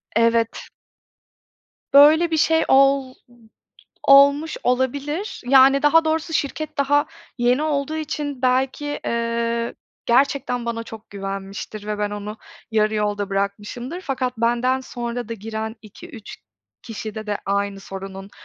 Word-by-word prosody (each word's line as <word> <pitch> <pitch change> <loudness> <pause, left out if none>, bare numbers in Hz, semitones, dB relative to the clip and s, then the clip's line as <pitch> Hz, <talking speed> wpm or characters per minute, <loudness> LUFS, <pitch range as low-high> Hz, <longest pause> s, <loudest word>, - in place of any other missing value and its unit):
Evet. 230 0 +1 1.3
Böyle 315 +4 +7
bir 320 - +1
şey 320 +1 +3
ol 270 -1 +4 1.0
olmuş 280 +3 +6
olabilir. 280 - -1
Yani 270 +1 +6
daha 320 +2 +5
doğrusu 320 +1 -1
şirket 305 +1 -3
daha 290 +1 +2 0.3
yeni 245 +4 +2
olduğu 305 0 -1
için 295 -4 -4
belki, 265 +3 0
ııı, 235 0 -1 0.3
gerçekten 250 -1 +1
bana 230 -1 -3
çok 225 -1 -12
güvenmiştir 195 +1 -6
ve 210 -1 -3
ben 205 0 -1
onu 205 +1 -6 0.3
yarı 215 0 +1
yolda 205 -1 -1
bırakmışımdır, 205 - -3
fakat 260 -7 -3
benden 240 +3 +1
sonra 240 -2 -5
da, 230 - -4
giren 220 +1 -5
2-3 225 - -11 0.5
kişide 220 -1 -7
de, 205 -1 -2
aynı 200 0 -1
sorunun 195 0 -8
245 Hz, 120 wpm, -22 LUFS, 215-280 Hz, 1.3 s, Böyle